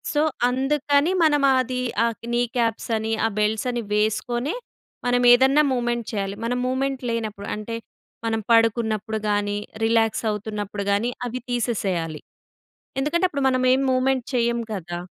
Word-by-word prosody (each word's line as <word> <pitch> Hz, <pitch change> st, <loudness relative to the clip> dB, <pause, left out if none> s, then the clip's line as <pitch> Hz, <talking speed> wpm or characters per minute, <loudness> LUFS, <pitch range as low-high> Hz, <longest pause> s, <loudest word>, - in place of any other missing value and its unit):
So 295 Hz, -, +4 dB, 0.3 s
అందుకని 285 Hz, +4 st, +1 dB
మనం 295 Hz, -2 st, +3 dB, 0.2 s
అది 255 Hz, 0 st, -1 dB, 0.3 s
ఆక్ 230 Hz, 0 st, -4 dB
నీ 240 Hz, 0 st, +2 dB
కాప్స్ 230 Hz, -2 st, 0 dB
అని, 220 Hz, +1 st, -2 dB
ఆ -, -, +2 dB
బెల్ట్స్ 210 Hz, +2 st, +1 dB
అని 240 Hz, -1 st, -2 dB
వేసుకొనె 240 Hz, +6 st, 0 dB, 0.5 s
మనం 245 Hz, 0 st, +2 dB
ఏదన్నా 265 Hz, +4 st, +5 dB
మూ‌వ్‌మెంట్ 240 Hz, -2 st, -1 dB
చేయాలి. 195 Hz, -1 st, -2 dB
మనం 245 Hz, +2 st, 0 dB
మూ‌వ్‌మెంట్ 265 Hz, +1 st, -1 dB
లేనప్పుడు, 215 Hz, -3 st, -3 dB
అంటే 215 Hz, +2 st, -5 dB, 0.5 s
మనం 225 Hz, 0 st, 0 dB
పడుకున్నప్పుడు 220 Hz, -1 st, +2 dB
గాని, 205 Hz, 0 st, 0 dB, 0.3 s
రిలాక్స్ 225 Hz, 0 st, +2 dB
అవుతున్నప్పుడు 210 Hz, -1 st, -4 dB
గాని, 210 Hz, +5 st, +1 dB, 0.2 s
అవి 245 Hz, +1 st, -4 dB
తీసేసేయాలి. 190 Hz, -10 st, -1 dB, 0.8 s
ఎందుకంటే, 340 Hz, +6 st, +2 dB
అప్పుడు 280 Hz, -3 st, -2 dB
మనం 255 Hz, 0 st, +1 dB
ఏమి 270 Hz, -, +1 dB
మూ‌వ్‌మెంట్ 255 Hz, -1 st, +1 dB
చేయం 235 Hz, -1 st, +1 dB
కదా! 175 Hz, -3 st, -5 dB
235 Hz, 140 wpm, -23 LUFS, 215-255 Hz, 0.8 s, ఏదన్నా